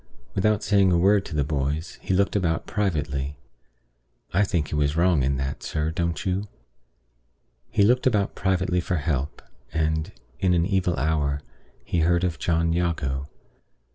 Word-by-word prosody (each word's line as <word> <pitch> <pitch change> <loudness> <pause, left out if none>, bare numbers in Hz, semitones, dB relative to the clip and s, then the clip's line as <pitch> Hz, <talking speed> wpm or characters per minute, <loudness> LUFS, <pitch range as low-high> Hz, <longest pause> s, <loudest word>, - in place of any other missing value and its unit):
Without 105 - +1
saying 100 -2 +4
a 85 - +4
word 100 +3 +4
to 85 - -6
the 75 - +2
boys, 75 +2 -2
he - - -4
looked 100 +2 +2
about 85 -5 0
privately 75 -8 -2 1.0
(I 100 +4 +4
think 85 -7 0
he - - -3
was 75 +1 +1
wrong 85 -4 +3
in 70 +1 +1
that, 65 0 -3
sir; 75 +1 -2
don't 85 +3 -2
you?) 95 +2 -1 1.2
he 100 - +3
looked 125 +5 +4
about 105 -5 +1
privately 95 -2 0
for 90 - -1
help; 75 -2 -2 0.3
and, 80 0 0 0.3
in 90 -2 +3
an 85 0 +2
evil 95 -3 +1
hour, 75 0 0 0.5
he 85 - 0
heard 85 +2 +3
of 85 -6 -1
John 85 +3 +1
Jago. 75 -6 -1
85 Hz, 160 wpm, -25 LUFS, 75-95 Hz, 1.2 s, saying